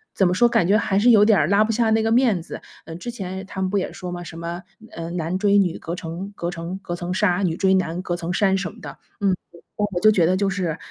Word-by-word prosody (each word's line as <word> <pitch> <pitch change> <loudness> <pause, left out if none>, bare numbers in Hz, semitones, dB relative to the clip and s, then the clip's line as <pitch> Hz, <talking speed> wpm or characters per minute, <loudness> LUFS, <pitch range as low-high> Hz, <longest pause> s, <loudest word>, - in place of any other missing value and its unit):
怎 190 - +3
么 180 - +1
说， 240 +6 +4
感 175 - +2
觉 205 +2 +4
还 195 -3 0
是 245 +4 +4
有 215 -3 +7
点 210 -5 +4
儿 145 - +2
拉 200 +4 +4
不 225 - -1
下 230 0 +2
那 220 0 +3
个 225 - 0
面 230 -6 +3
子。 - - -9 0.2
呃， 165 - -8
之 210 +8 -6
前 190 -4 -6
他 190 0 -6
们 190 - 0
不 200 - 0
也 190 - -2
说 180 -1 -7
嘛， 175 0 -6
什 165 -1 -10
么， 170 +2 -5 0.3
呃， 165 0 -6
男 170 +1 -2
追 200 +1 +3
女， 185 -4 +2
隔 165 - -6
成 180 +4 -6
隔 170 - -3
成 175 +2 -6
隔 175 -2 -5
层 175 +1 -4
纱， 185 -2 +2
女 170 -3 0
追 190 0 +3
男， 180 -2 0
隔 175 -2 -3
层 175 0 -4
山 195 0 +2
什 185 -4 -4
么 - - -16
的， - - -9 0.2
嗯， 195 -2 +3 0.4
我 205 -4 -1
就 215 - +6
觉 185 -6 +3
得 185 - +2
就 200 +1 +1
是 180 -5 -2
185 Hz, 305 characters per minute, -22 LUFS, 175-205 Hz, 0.4 s, 有